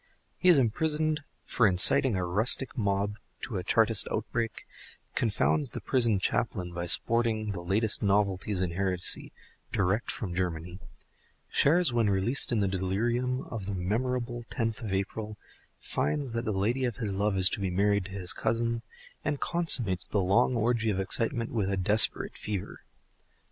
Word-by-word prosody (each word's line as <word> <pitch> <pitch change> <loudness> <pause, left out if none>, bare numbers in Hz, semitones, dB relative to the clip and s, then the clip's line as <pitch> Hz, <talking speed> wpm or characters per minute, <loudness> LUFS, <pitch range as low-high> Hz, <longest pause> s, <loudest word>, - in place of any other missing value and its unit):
He 185 - +3
is 175 - +7
imprisoned 150 +5 0 0.2
for 115 - +2
inciting 95 +5 +5
a 90 -1 -1
rustic 110 +10 +2
mob 105 -2 -1 0.2
to 115 -7 -4
a 90 - -4
Chartist 110 +2 +3
outbreak, 115 +1 -3 0.5
confounds 120 +5 0
the - - -7
prison 115 -5 +1
chaplain 95 -2 -2
by 85 0 -4
sporting 110 +1 0
the 90 -3 -5
latest 105 +5 0
novelties 100 -1 0
in 90 -2 -1
heresy 90 0 0 0.4
direct 100 +4 0
from 95 -6 -4
Germany, 90 0 -4 0.7
shares 160 -1 +3
when 115 -3 +2
released 100 +9 +1
in 115 -3 +1
the 100 - +1
delirium 120 +7 -1
of 105 -5 -6
the 100 - -3
memorable 120 +6 -2
tenth 115 -1 -3
of 110 -4 -5
April, 105 +2 -4 0.4
finds 145 -5 -3
that 115 0 -3
the 110 - -1
lady 110 +7 -1
of 120 -3 -3
his 110 -5 -3
love 100 0 0
is 95 -1 +8
to - - -2
be 95 -1 -2
married 100 +1 +1
to 95 - -9
his 95 -3 -2
cousin, 115 0 -1 0.4
and 145 -1 -2
consummates 125 - +3
the 105 - -1
long 100 +7 +2
orgy 115 0 0
of 100 -2 -1
excitement 115 +4 0
with 105 -5 -1
a 95 - -1
desperate 105 +4 +3
fever. 105 -4 -5
105 Hz, 160 wpm, -28 LUFS, 95-120 Hz, 0.7 s, is